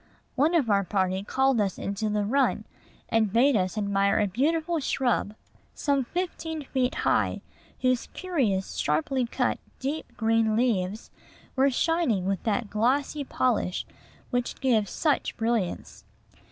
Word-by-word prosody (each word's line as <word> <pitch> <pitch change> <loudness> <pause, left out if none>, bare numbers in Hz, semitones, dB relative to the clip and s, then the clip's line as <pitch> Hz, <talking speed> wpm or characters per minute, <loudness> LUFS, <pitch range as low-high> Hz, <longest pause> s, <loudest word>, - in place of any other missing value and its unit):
One 305 +6 +2
of 295 -8 +3
our 200 -2 +3
party 190 0 0
called 265 +3 +2
us 195 -3 -1
into 200 +2 -2
the 210 -1 0
run, 270 +5 +1 0.4
and 220 -3 +2
bade 260 +6 +4
us 185 +1 0
admire 200 -1 +2
a 210 - +3
beautiful 315 - 0
shrub, 250 -6 0 0.4
some 280 -3 0
fifteen 325 -1 -4
feet 260 -1 0
high, - - +1 0.4
whose 255 -1 +1
curious, 255 - -1
sharply 235 - 0
cut, - - 0 0.2
deep 290 +4 -5
green 225 -1 +2
leaves 215 -3 0 0.4
were 270 +1 +4
shining 270 - +1
with 195 -1 -1
that 225 +1 0
glossy 275 +7 +1
polish 245 -8 0 0.5
which 245 -1 -2
gives 225 -7 +2
such 300 - 0
brilliance. 225 -5 -2
235 Hz, 135 wpm, -27 LUFS, 205-275 Hz, 0.5 s, bade